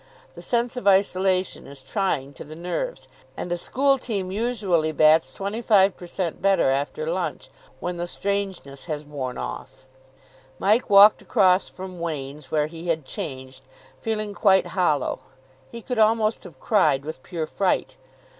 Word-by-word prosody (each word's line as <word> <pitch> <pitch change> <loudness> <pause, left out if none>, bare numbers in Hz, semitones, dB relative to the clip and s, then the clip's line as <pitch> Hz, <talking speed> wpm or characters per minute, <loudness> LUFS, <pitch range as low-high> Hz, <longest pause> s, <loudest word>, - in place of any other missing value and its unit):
The - - -11
sense 240 0 -1
of 245 - -3
isolation 190 -1 +2
is 140 0 -11
trying 140 -1 -2
to - - -9
the 155 +2 -10
nerves, 180 - -4 0.3
and 175 - -5
a - - +2
school 275 +9 +1
team 200 -7 -3
usually 200 -7 0
bats 155 -3 +4
25 200 - +2
per 175 - -11
cent. 175 -2 -3
better 195 -8 +3
after 140 - -2
lunch, - - -3 0.3
when 180 0 -4
the 175 0 -3
strangeness 190 -8 -3
has 150 -2 -4
worn 135 -4 -5
off. - - -7 0.7
Mike 215 +5 +2
walked 205 +1 +8
across 185 0 +3
from 185 -1 -9
Wain's, 145 -4 -5
where 150 0 +1
he 165 +2 -8
had 160 -4 -1
changed, 130 -2 -7 0.4
feeling 215 -2 -2
quite 195 -2 +4
hollow. 175 -8 +1 0.5
He 235 -1 -9
could 250 -3 -3
almost 220 -1 +2
have 160 -7 -13
cried 140 -2 +2
with 155 -3 -7
pure 165 -1 -4
fright. 185 +4 -1
180 Hz, 155 wpm, -24 LUFS, 150-200 Hz, 0.7 s, walked